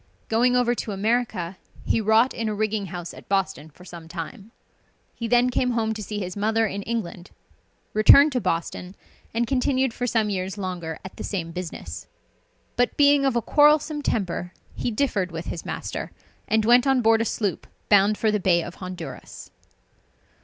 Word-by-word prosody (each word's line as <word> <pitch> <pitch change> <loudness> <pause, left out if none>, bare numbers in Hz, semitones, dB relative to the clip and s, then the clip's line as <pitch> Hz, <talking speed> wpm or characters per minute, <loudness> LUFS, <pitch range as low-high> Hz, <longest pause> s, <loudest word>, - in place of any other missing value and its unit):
Going 245 +3 +3
over 245 -1 +3
to 220 -3 -4
America, 205 -4 -1 0.3
he 225 - +1
wrought 220 +4 +3
in 225 -1 -2
a 210 - -2
rigging 215 -1 -1
house 175 0 -7
at - - -14
Boston 195 -5 -1
for 180 +4 -17
some 170 -2 -10
time. 180 +6 -7 0.6
He 230 - -5
then 245 +2 +3
came 250 0 +1
home 220 -1 0
to 215 - -7
see 210 +1 -5
his 185 -3 -4
mother 220 +2 +1
in 200 -1 -3
England, 195 -5 -4 0.6
returned 280 +8 +7
to 250 -2 -1
Boston, 180 +2 -3 0.4
and 235 +1 0
continued 260 0 +1
for 245 - -3
some 220 -3 +1
years 190 +1 -3
longer 180 -5 -4
at 190 - -10
the - - -6
same 170 -5 -3
business. 180 -1 -7 0.7
But 245 - +1
being 285 -1 +5
of 265 -3 +1
a 235 - +1
quarrelsome 300 +2 +4
temper, 180 -8 -2 0.2
he - - -2
differed 215 -6 -1
with 165 0 -6
his 170 - -6
master, - - -5 0.4
and 220 0 +2
went 245 +3 +5
on 265 -2 +3
board 225 0 +4
a - - +2
sloop 205 -3 -2 0.2
bound 205 +1 +4
for 220 - +1
the 210 - 0
Bay 175 -3 +2
of 175 - -9
Honduras. 185 -1 -8
215 Hz, 180 wpm, -24 LUFS, 185-240 Hz, 0.7 s, returned